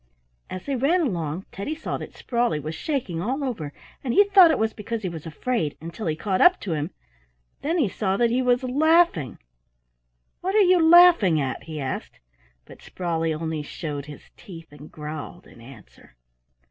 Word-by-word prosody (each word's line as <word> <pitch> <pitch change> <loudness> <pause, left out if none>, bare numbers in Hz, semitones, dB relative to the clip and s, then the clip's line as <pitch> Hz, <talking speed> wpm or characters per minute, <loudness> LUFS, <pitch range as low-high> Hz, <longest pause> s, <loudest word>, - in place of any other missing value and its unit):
As 185 0 -7
they 280 - -2
ran 295 +9 +2
along 175 - -2
Teddy 245 +11 -4
saw 315 - -4
that - - -9
Sprawley 235 -10 -1
was 155 +2 -5
shaking 235 - -3
all 265 +8 -2
over, 190 - -4 0.3
and 245 -2 -2
he 405 - +8
thought 390 -4 +7
it 315 - +2
was 220 0 0
because 220 +1 -5
he 185 - -1
was 165 -1 -8
afraid, 160 - -2
until 170 +5 -6
he 155 - 0
caught 190 +3 -1
up 360 +1 +6
to 185 - -3
him; 150 +1 -2 0.7
then 325 +5 -1
he 290 -9 +2
saw 195 0 -1
that 235 0 +2
he 250 +2 +1
was 250 0 +2
laughing. 285 - +2 1.0
"What 380 +3 -2
are 430 - +6
you 365 -1 +4
laughing 325 - +6
at?" 135 -3 -3
he 155 -2 -6
asked, 135 -2 -5 0.5
but - - -15
Sprawley 165 -3 -2
only 160 0 -3
showed 145 -1 -6
his 150 - -12
teeth 165 -5 -12
and 145 +1 -13
growled 155 +3 -8
in 115 - -17
answer. 115 - -16
190 Hz, 185 wpm, -24 LUFS, -, 1.0 s, he